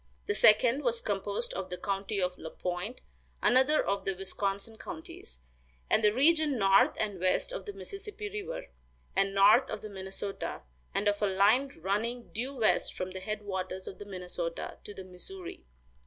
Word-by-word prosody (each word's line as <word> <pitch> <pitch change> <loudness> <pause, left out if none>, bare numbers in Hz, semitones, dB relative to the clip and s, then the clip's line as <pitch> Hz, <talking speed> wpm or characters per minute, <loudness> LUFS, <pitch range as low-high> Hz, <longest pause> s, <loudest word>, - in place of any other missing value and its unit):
The 415 - 0
second 240 - +5
was 235 -4 +1
composed 205 -1 -2
of 190 -1 -4
the 180 - -4
county 200 +2 -2
of 180 -1 0
La 160 - -7
Pointe 180 +9 -4 0.4
(another 265 +5 +4
of 200 0 0
the 195 - -1
Wisconsin 195 +3 -2
counties), 160 - -8 0.5
and 220 - +4
the 210 - +6
region 295 +3 +4
north 195 -2 +5
and 205 -4 -1
west 185 - +1
of - - -5
the 410 - -4
Mississippi 405 +2 -6
river, 420 +4 -5 0.5
and 195 0 +2
north 210 +6 +6
of - - -5
the 215 - -6
Minnesota, 195 - -5 0.3
and 205 - 0
of 205 0 +2
a 205 - +3
line 210 +8 +3
running 230 +5 -1
due 255 +5 -3
west 225 -4 +2
from 185 0 -3
the 190 - -6
head 210 +2 -4
waters 190 -1 -4
of 185 - -7
the 205 - -7
Minnesota 180 -3 -5
to 205 - -7
the 190 - -7
Missouri. 345 - -9
205 Hz, 175 wpm, -31 LUFS, 190-250 Hz, 0.5 s, the